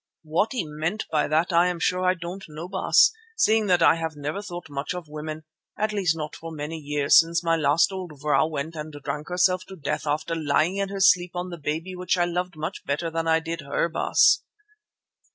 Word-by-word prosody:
"What 165 +9 0
he 240 -8 -1
meant 155 +8 -3
by 150 - +2
that 160 +4 +1
I 170 +1 +5
am 180 -1 -2
sure 180 +2 0
I 185 0 +3
don't 180 +2 -7
know, 155 +3 -7
Baas, 190 0 +4 0.3
seeing 220 - +3
that 180 -2 +3
I - - +6
have 160 -1 -4
never 150 +6 -4
thought 175 -4 -7
much 145 +4 -4
of 175 -3 -7
women, 155 +1 -6 0.3
at 215 0 0
least 180 -5 +1
not 150 -1 -5
for 165 0 -8
many 155 +1 -5
years 145 -1 +4
since 170 +1 +1
my 165 -1 +2
last 160 +3 +3
old 180 -6 -7
vrouw 150 +2 +2
went 155 +1 -4
and 155 0 -6
drank 145 +1 -5
herself 180 +1 +2
to 190 - -9
death 155 -2 -3
after 150 +3 -1
lying 160 +3 +1
in 195 -1 -1
her 195 0 -4
sleep 180 -2 +4
on 180 +1 -4
the 170 - -7
baby 160 +5 -3
which 180 0 0
I 175 - +3
loved 180 0 -3
much 155 +5 -5
better 155 +4 -2
than 165 0 -2
I 160 0 +3
did 165 -1 -5
her, 140 +4 -1
Baas. 160 - +4
165 Hz, 220 wpm, -25 LUFS, 155-180 Hz, 0.3 s, I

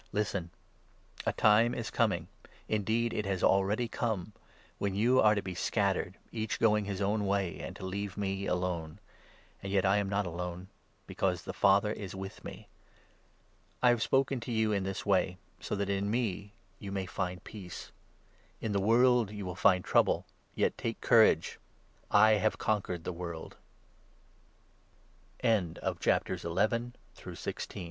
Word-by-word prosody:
Listen! 100 -4 -1 0.7
31, - - -9
32 - - +2
a - - -1
time 110 +3 +5
is - - -4
coming - - +1 0.2
— - - -26
indeed 110 +3 0
it 105 -2 -2
has 95 -2 -1
already 100 +5 +3
come 110 -4 -2 0.2
— - - -29
when 100 -1 -1
you 120 +5 +4
are 110 0 +5
to 100 - -2
be 95 -1 -5
scattered, 95 0 0
each 110 -1 -3
going 105 -2 +3
his 100 -1 -4
own 105 +1 0
way, 95 -4 0
and - - -6
to - - -7
leave 100 +1 -4
me 95 -1 -2
alone; 90 -2 -2 0.6
and 95 - -5
yet 100 -1 +2
I 95 +1 +4
am 100 -1 0
not 100 0 0
alone, 90 +2 -5 0.4
because - - -1
the - - -6
Father 100 +2 +4
is 100 -3 -7
with 95 0 -7
me. - - -9 1.2
I 125 - +7
have 120 -2 +3
spoken 135 +1 +2
to 120 - -6
you 110 -1 +1
in 100 -2 0
this 95 0 -4
way, 95 -2 +2 0.2
so - - -3
that 100 -1 -1
in 100 0 -1
me 105 -3 -2 0.3
you 100 - -7
may 95 -1 -2
33 95 - -12
find 90 0 -2
peace. 95 -5 -9 0.7
In 110 - -3
the 100 -1 +1
world 120 +1 +4
you 105 -2 -6
will 90 - -4
find 90 0 +3
trouble; - - +3 0.3
yet, - - +1
take - - -3
courage! - - +4 0.5
I 110 -1 +6
have 110 - +1
conquered 95 -5 -1
100 Hz, 155 wpm, -31 LUFS, 95-110 Hz, 1.2 s, I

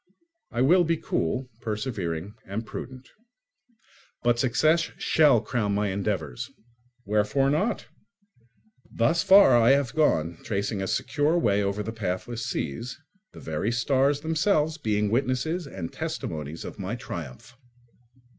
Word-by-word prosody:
I 120 - -2
will 175 +7 +5
be 165 0 +1
cool, 125 - -2
persevering, 105 -5 -3
and 105 +4 -4
prudent. 130 +3 -8 1.2
But 120 -1 +2
success 155 +7 +2
shall 145 -8 +4
crown 105 -3 -1
my 105 0 0
endeavours. 95 -10 -3 0.6
Wherefore 105 +7 +2
not? 195 +10 0 1.1
Thus 120 +9 +2
far 195 -9 +7
I 120 +2 +6
have 140 -4 +1
gone, 85 - +1
tracing 100 -2 -2
a 95 - -2
secure 150 - +1
way 105 -10 +2
over 100 +1 -1
the 110 +2 -5
pathless 110 +3 -3
seas, 115 - -4 0.3
the - - -11
very 80 +8 -2
stars 135 +4 +2
themselves 160 0 +1
being 105 -4 0
witnesses 135 +7 0
and 90 -10 -6
testimonies 75 +1 -5
of - - -8
my 100 +4 -3
triumph. 85 - -8
115 Hz, 125 wpm, -26 LUFS, 100-140 Hz, 1.2 s, far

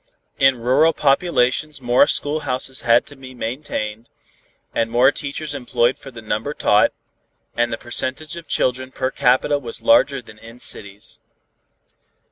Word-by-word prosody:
In 135 -2 +4
rural 135 +7 +3
populations 145 -1 +1
more 120 -1 +3
schoolhouses 135 -3 -1
had 120 -1 +3
to 145 - -13
be 130 -1 -12
maintained, 115 -3 -5 0.6
and 115 0 0
more 125 +4 +4
teachers 145 +1 -5
employed 125 -2 0
for 135 - -11
the 115 -3 -11
number 110 +7 -3
taught, 105 - +3 0.6
and 120 0 0
the 115 - -2
percentage 130 +7 -2
of 170 -1 -10
children 130 +1 -1
per 130 0 -2
capita 130 +4 +2
was 120 -4 -6
larger 215 - +4
than 115 -3 -15
in 115 +2 -13
cities. 100 -3 -4
130 Hz, 140 wpm, -20 LUFS, 120-145 Hz, 0.6 s, In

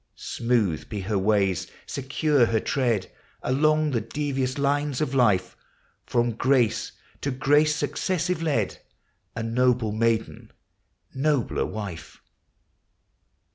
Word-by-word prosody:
Smooth 115 -9 -1
be 105 -2 -4
her 100 +1 -1
ways, 95 -3 +1 0.2
secure 140 -1 +1
her 115 -1 +1
tread 120 -8 0 0.3
Along 155 +3 +2
the 115 -4 0
devious 135 +1 -2
lines 145 -1 0
of 150 -4 -1
life, 105 -8 +2 0.5
From 120 0 +1
grace 120 0 +1 0.3
to 140 - -1
grace 145 +4 +3
successive 175 +3 -1
led, 140 - 0 0.3
— - - -45
A 115 - -3
noble 120 -1 +1
maiden, 115 +1 -1 0.6
nobler 140 -2 0
wife! 100 -6 -7
125 Hz, 110 wpm, -25 LUFS, 110-145 Hz, 0.6 s, grace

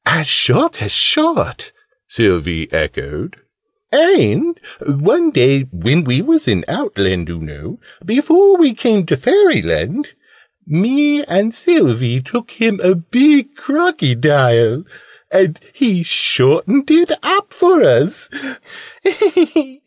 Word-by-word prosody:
"As - - +1
short 335 - +1
as - - -5
short!" 335 +8 0 0.4
Sylvie 85 - -2
echoed. 75 - -5 0.6
"And 340 +1 +2 0.2
one 165 - +1
day 135 - +2
when 125 - -1
we 130 +5 -1
was 320 +5 0
in 90 -5 -1
Outland, 95 -3 -3
oo 85 - -8
know 75 -2 -12 0.2
before 335 - +3
we 305 -8 +3
came 220 -5 0
to 155 - -1
Fairyland 375 - 0 0.5
me 275 - 0
and 200 +6 -1
Sylvie 130 - 0
took 235 - -6
him 225 -4 -1
a 185 +1 +3
big 265 - +2
Crocodile. 140 - 0 0.4
And 185 -4 +1
he 220 -11 -1
shortened 195 - 0
it 325 +2 +3
up 400 +2 -1
for 365 +1 +3
us. - - +1
220 Hz, 110 wpm, -14 LUFS, -, 0.6 s, before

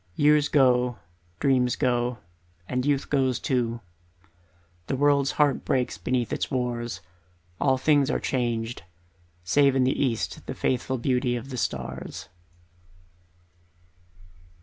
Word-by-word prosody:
Years 150 0 +4
go, 125 -4 +3 0.4
dreams 125 -3 +2
go, 120 -1 0 0.5
and 125 +2 -1
youth 140 -2 0
goes 130 -3 +2
too, 120 -3 -1 1.1
The - - -1
world's 140 0 +2
heart 145 -3 +2
breaks 130 -2 -1
beneath 125 -2 -1
its - - -2
wars, 120 -6 -3 0.6
All 135 -2 +3
things 145 0 +3
are - - 0
changed, 120 -3 -2 0.6
save 140 +9 +3
in 130 - +3
the 130 - +3
east 120 -5 -2
The - - -4
faithful 130 +1 -1
beauty 125 0 0
of 120 +3 -6
the - - -4
stars. 65 - -4
125 Hz, 120 wpm, -26 LUFS, 120-135 Hz, 1.1 s, Years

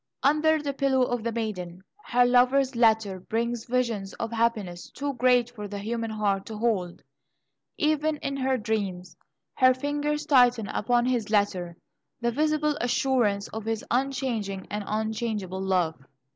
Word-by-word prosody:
Under 305 +2 +3
the 285 -1 -3
pillow 270 -1 +2
of 245 -1 -1
the 235 - -1
maiden, 190 -6 -4 0.2
her 245 0 +3
lover's 255 +2 +3
letter 220 -5 +3
brings 230 +4 -2
visions 235 -6 -1
of 230 - -4
happiness 220 -6 -1
too 280 0 -4
great 245 -1 +3
for 210 -4 -7
the 205 0 -6
human 225 +2 -3
heart 205 -3 -1
to 220 - -6
hold. 205 -6 -1 0.7
Even 305 0 +1
in 275 -1 -4
her 265 -1 +1
dreams, 200 -5 -3 0.4
her 255 -1 +5
fingers 295 +2 -2
tighten 245 -6 +4
upon 240 +2 +1
his 245 -4 0
letter 190 -5 0 0.4
the 235 0 0
visible 300 +2 +1
assurance 245 -5 +1
of 220 -1 -6
his 225 -1 -2
unchanging 240 -7 -1
and 210 0 -3
unchangeable 215 -3 -2
love. 180 -6 0
235 Hz, 145 wpm, -26 LUFS, 205-260 Hz, 0.7 s, her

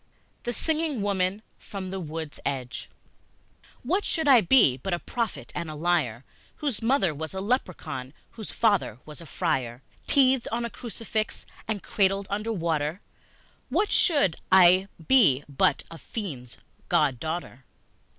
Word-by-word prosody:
The 240 - 0
Singing 310 -4 -1
Woman 195 +1 0 0.2
from 190 -2 -7
the 190 - -4
Wood's 160 -2 -6
Edge 130 -2 -4 0.9
WHAT 365 +11 +1
should 320 -3 0
I 260 -5 +8
be 180 - +5
but 175 +7 -2
a - - -4
prophet 230 +4 -4
and 170 -2 -4
a 155 - -6
liar, 150 -8 0 0.3
Whose 280 -8 -3
mother 225 - +2
was 160 +5 -6
a - - -2
leprechaun, 185 - -2 0.2
whose 220 -3 -8
father 205 - +1
was 150 +1 -10
a 165 - -11
friar? 135 -8 -2 0.2
Teethed 265 -3 +4
on 235 +1 -1
a 235 - -5
crucifix 220 -2 -4 0.2
and 210 -2 -3
cradled 195 0 +1
under 210 +3 -1
water, 165 -3 -1 0.7
What 370 +10 +1
should 290 - +3
I 185 +1 +7 0.2
be 170 - +5
but 140 -2 +1
a 165 - -9
fiend's 140 - -7 0.3
god 150 -8 +2
daughter? 160 -4 -5
190 Hz, 145 wpm, -26 LUFS, 155-230 Hz, 0.9 s, I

